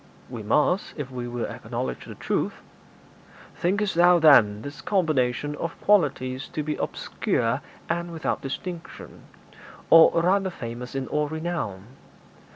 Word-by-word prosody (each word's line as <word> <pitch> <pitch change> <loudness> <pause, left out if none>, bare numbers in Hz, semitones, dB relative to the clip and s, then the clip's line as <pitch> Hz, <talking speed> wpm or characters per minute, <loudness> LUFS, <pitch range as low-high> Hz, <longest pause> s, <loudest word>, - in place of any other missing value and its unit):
'We 120 -3 -5
must 150 - +1
if 140 -3 -5
we 125 -1 -5
will 120 0 -3
acknowledge 65 -1 -5
the - - -8
truth.' - - -2 1.0
'Thinkest 200 +3 0
thou, 175 +1 +6
then, 115 -10 +5
this 145 - -8
combination 150 -6 0
of 165 - -5
qualities 135 -9 +1
to 155 - -4
be 150 +1 -2
obscure - - -1 0.3
and 170 +1 -2
without 160 -2 -2
distinction, 170 +5 -7 0.7
or 165 0 +8
rather 190 +2 +2
famous 120 -5 -7
in 135 -1 -2
all 150 0 0
renown? 160 - -4
150 Hz, 130 wpm, -25 LUFS, 125-175 Hz, 1.0 s, or